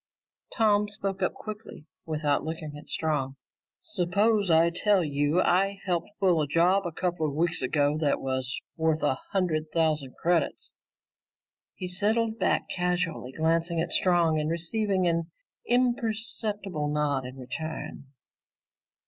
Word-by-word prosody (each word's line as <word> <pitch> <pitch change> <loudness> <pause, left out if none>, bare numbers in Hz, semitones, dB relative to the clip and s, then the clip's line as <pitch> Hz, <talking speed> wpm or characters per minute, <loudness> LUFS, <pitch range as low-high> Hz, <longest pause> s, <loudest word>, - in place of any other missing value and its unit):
Tom 210 -2 +3
spoke 195 -2 -3
up 185 - 0
quickly 215 -7 -9 0.2
without 150 -2 0
looking 155 -2 -5
at 150 - -11
Strong. 145 -4 -1 0.5
"Suppose 205 +1 +1
I 165 +1 +5
told 195 0 +2
you 145 +5 +2
I 195 +2 +2
helped 175 -3 -1
pull 180 -5 +3
a 150 - 0
job 175 +5 +3
a - - -4
couple 175 -1 -1
of 140 - -4
weeks 170 +2 +1
ago 145 +3 +1
that 145 -3 +1
was 130 -1 -2 0.2
worth 160 -1 0
a 130 -3 +1
hundred 160 -6 0
thousand 155 -5 0
credits?" 175 0 0 1.0
He 185 - -5
settled 220 +5 +1
back, - - +1
casually 180 -7 -1
glancing 165 +3 +1
at 165 +1 -1
Strong 170 -4 +3
and 150 0 -1
receiving 185 +3 0
an 170 -1 0 0.4
imperceptible 220 -8 0
nod 145 -3 0
in 130 +1 -8
return. 140 +4 -6
170 Hz, 135 wpm, -27 LUFS, 155-195 Hz, 1.0 s, I